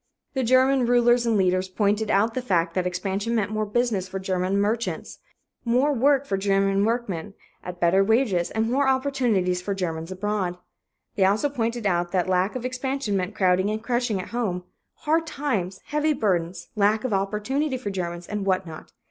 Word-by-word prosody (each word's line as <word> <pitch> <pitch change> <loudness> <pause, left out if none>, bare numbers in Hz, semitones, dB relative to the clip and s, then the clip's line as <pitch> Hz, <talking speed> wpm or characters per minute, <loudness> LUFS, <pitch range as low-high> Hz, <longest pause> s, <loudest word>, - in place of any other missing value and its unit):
The 265 - 0
German 260 +1 +4
rulers 240 0 +4
and 225 -2 +2
leaders 185 -1 +2
pointed 205 +2 0
out 215 +3 +2
the 255 - -2
fact 170 -8 0
that 180 0 0
expansion 195 +5 -2
meant 210 -2 0
more 215 0 -1
business 210 -4 0
for 190 +1 -5
German 190 +1 -1
merchants, 220 +3 -2 0.4
more 255 +5 +2
work 275 +2 +3
for 195 -7 -1
German 195 0 +2
workmen 210 -5 -2 0.3
at 180 -1 -7
better 180 +3 +4
wages, 215 -5 +2
and 220 0 -1
more 275 +2 +2
opportunities 250 -10 +1
for 200 +2 -3
Germans 165 -2 -4
abroad. 185 -2 -2 0.6
They 195 - +3
also 210 +9 +2
pointed 235 -4 -2
out 175 -2 +1
that 185 -1 +1
lack 185 +3 +1
of 250 -1 -4
expansion 255 -3 -2
meant 190 +2 -2
crowding 185 0 +2
and 215 +1 -3
crushing 240 -4 0
at 185 - -6
home, 205 -7 -2 0.4
hard 325 +2 +1
times, 215 - -2
heavy 300 +1 +1
burdens, 180 - -1
lack 215 +1 +2
of 255 -5 -1
opportunity 215 +9 -1
for 210 -5 -4
Germans, 175 -2 -4
and 210 +1 -4
what 190 -1 +1
not. 160 -2 -10
205 Hz, 180 wpm, -24 LUFS, 185-245 Hz, 0.6 s, German